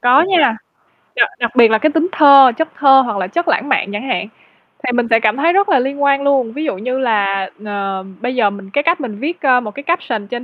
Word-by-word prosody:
Có 250 +4 +4
nha, 325 -11 +2 0.6
đặc - - +2
đặc 235 0 -3
biệt 235 -3 +5
là 220 - +3
cái 310 +7 0
tính 320 +3 0
thơ, 275 -4 +6
chất 320 - -1
thơ 270 -1 +5
hoặc 220 -4 -4
là 185 - -3
chất 340 - -3
lãng 290 -2 -1
mạn 265 -6 0
chẳng 210 +6 -5
hạn, 210 -6 -2 0.6
thì 250 - -1
mình 240 -1 0
sẽ 225 - +4
cảm 220 +2 0
thấy 330 +5 +1
rất 400 +1 +1
là 270 - +3
liên 280 +3 -3
quan 280 0 +2
luôn, 265 -5 0
ví 300 - -5
dụ 275 - -3
như 255 +6 -4
là, 200 -6 -1 0.2
ờ, 195 -2 -4 0.2
bây 250 +1 -3
giờ 225 -5 +2
mình 200 -1 -11
cái 285 - 0
cách 335 0 0
mình 215 -5 -7
viết, 325 +7 -5
ơ, 255 -3 +3
một 215 -3 -7
cái 280 - -8
caption 245 - -3
trên 240 +3 -6
255 Hz, 260 wpm, -16 LUFS, 220-285 Hz, 0.6 s, thơ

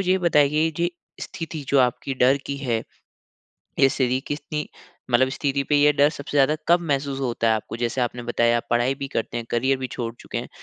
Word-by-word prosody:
ये 185 0 +2
बताइए 155 -2 +3
ये 170 +1 +1 0.3
स्थिति 160 -3 -6
जो 140 - +3
आपकी 125 +2 0
डर 130 +2 +4
की 140 - -3
है। 120 -5 -1 1.0
ये 135 - +6
स्थिति 130 -2 0
कितनी 150 +1 -4 0.4
मतलब 130 +2 +4
स्थिति 140 0 -1
पे 150 - +4
ये 145 +1 +5
डर 145 +1 +4
सबसे 145 -1 -5
ज़्यादा 140 +3 +4
कब 175 +1 +5
महसूस 140 -4 -2
होता 120 -3 -1
है - - +4
आपको? 110 - -5
जैसे 120 +2 -1
आपने 120 0 -2
बताया 120 0 +2
आप - - -3
पढ़ाई 120 +3 +2
भी 140 0 -5
करते 120 -2 -3
हैं, 115 - -4
करियर 130 +3 +1
भी 130 0 -4
छोड़ 115 -3 -4
चुके - - -6
हैं - - -5
135 Hz, 210 wpm, -23 LUFS, 120-145 Hz, 1.0 s, ये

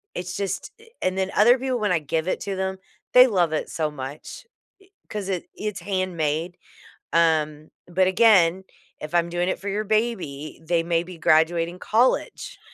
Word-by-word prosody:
it's 180 0 -5
just 200 - -3
a 455 0 -18
and 185 0 -1
then 190 0 -1
other 240 +5 +6
people, 260 -2 -1
when 210 -3 0
I 170 - +2
give 160 +2 -2
it - - -1
to 195 - -3
them, 190 0 -2 0.4
they 250 +1 +9
love 175 -8 +1
it 155 - -2
so 155 -2 -1
much. 140 +1 -8
I 465 - -67 0.4
'cause 205 -2 -5
it 185 -3 -3
it's 210 -3 -4
handmade. 175 -3 -2 0.6
Um, 155 -2 +1 0.2
but, 185 +1 +2
again, 190 -3 +4 0.4
if 155 +2 -7
I'm 170 0 +2
doing 175 +1 -1
it - - -2
for 200 - -8
your 205 +2 -1
baby, 195 -11 -2
they 165 +1 +1
may 170 0 0
be 180 0 -11
graduating 165 +2 +2
college, 235 +6 0
180 Hz, 180 wpm, -24 LUFS, 165-200 Hz, 0.6 s, they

